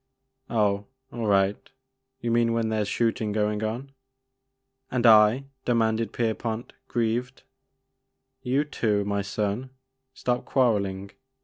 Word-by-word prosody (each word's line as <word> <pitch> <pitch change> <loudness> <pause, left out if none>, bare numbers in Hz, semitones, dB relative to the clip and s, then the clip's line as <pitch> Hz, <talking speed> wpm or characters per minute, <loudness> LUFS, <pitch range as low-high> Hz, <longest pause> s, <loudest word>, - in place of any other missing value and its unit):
" 130 0 -53
Oh, 105 -3 +1 0.3
all 115 -2 -3
right, 100 0 +2 0.3
— 130 -1 -47
^youmean 115 0 +2
when 115 -1 0
there 110 -1 0
's 105 - -1
shoot 115 +1 0
ing 105 -1 -1
going 105 0 0
on?'* 120 +6 -3 1.0
And 125 -1 0
I? 110 +3 +7
" 130 - -52
demanded 115 -1 +1
Kerpont, 115 0 -2
grieved. 120 +2 -1 1.0
You 135 +3 +1
too, 105 -8 0
my 100 0 0
son; 105 +5 -2 0.5
stop 125 0 -1
quarelling 100 -7 0
115 Hz, 130 wpm, -26 LUFS, 105-120 Hz, 1.0 s, I